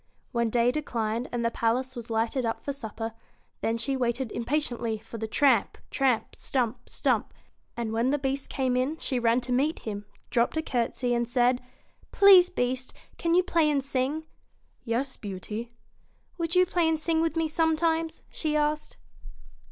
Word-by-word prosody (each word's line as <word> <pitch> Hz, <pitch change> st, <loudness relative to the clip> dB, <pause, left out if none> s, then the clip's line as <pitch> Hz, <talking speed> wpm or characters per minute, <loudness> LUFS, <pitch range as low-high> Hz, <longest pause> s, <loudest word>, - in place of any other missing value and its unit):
When 235 Hz, -1 st, +1 dB
day 240 Hz, +1 st, +3 dB
declined, 235 Hz, -5 st, -2 dB
and 240 Hz, -1 st, -1 dB
the 230 Hz, -, +2 dB
palace 255 Hz, +4 st, 0 dB
was 235 Hz, -1 st, -7 dB
lighted 230 Hz, +3 st, 0 dB
up 225 Hz, -1 st, -1 dB
for 280 Hz, -, -1 dB
supper, 225 Hz, -3 st, -5 dB, 0.5 s
then 225 Hz, +1 st, 0 dB
she 270 Hz, +4 st, -1 dB
waited 245 Hz, -1 st, -1 dB
impatiently 240 Hz, -3 st, -1 dB
for 225 Hz, +1 st, -9 dB
the 220 Hz, -, -3 dB
tramp, 245 Hz, -2 st, +3 dB
tramp! 260 Hz, -5 st, +1 dB
stump 250 Hz, -2 st, -1 dB
r -, -, -34 dB
stump -, -, +1 dB, 0.5 s
1 235 Hz, 0 st, -2 dB
and 220 Hz, -, -3 dB
when 230 Hz, +3 st, +2 dB
the 290 Hz, -, +2 dB
Beast 270 Hz, 0 st, -2 dB
came 260 Hz, -2 st, 0 dB
in 260 Hz, +5 st, 0 dB
she 260 Hz, -5 st, -1 dB
ran 235 Hz, +1 st, +3 dB
to 250 Hz, +1 st, -5 dB
meet 280 Hz, +6 st, +2 dB
him, 205 Hz, -2 st, -5 dB, 0.2 s
dropped 240 Hz, +5 st, +2 dB
a 315 Hz, -, 0 dB
courtesy, 245 Hz, -2 st, -1 dB
and 235 Hz, 0 st, 0 dB
said, 245 Hz, 0 st, +3 dB, 0.3 s
' -, -, -33 dB
Please, 385 Hz, -3 st, +8 dB
Beast, 255 Hz, -2 st, -2 dB, 0.2 s
can 335 Hz, 0 st, +2 dB
you 365 Hz, -, +5 dB
play 330 Hz, -4 st, +2 dB
and 280 Hz, -2 st, +1 dB
sing? 275 Hz, +3 st, -1 dB, 0.3 s
' -, -, -40 dB
'Yes, 260 Hz, +3 st, -2 dB
Beauty.' 210 Hz, +4 st, -6 dB, 0.3 s
* -, -, -39 dB
Would 335 Hz, 0 st, -1 dB
you 365 Hz, 0 st, +6 dB
play 345 Hz, -2 st, +1 dB
and 320 Hz, -1 st, +1 dB
sing 320 Hz, 0 st, +1 dB
with 330 Hz, -1 st, 0 dB
me, 325 Hz, -1 st, +1 dB
sometimes? 320 Hz, 0 st, +1 dB
' -, -, -33 dB
she 310 Hz, -2 st, -2 dB
asked. 300 Hz, 0 st, 0 dB
255 Hz, 190 wpm, -27 LUFS, 235-305 Hz, 0.5 s, Please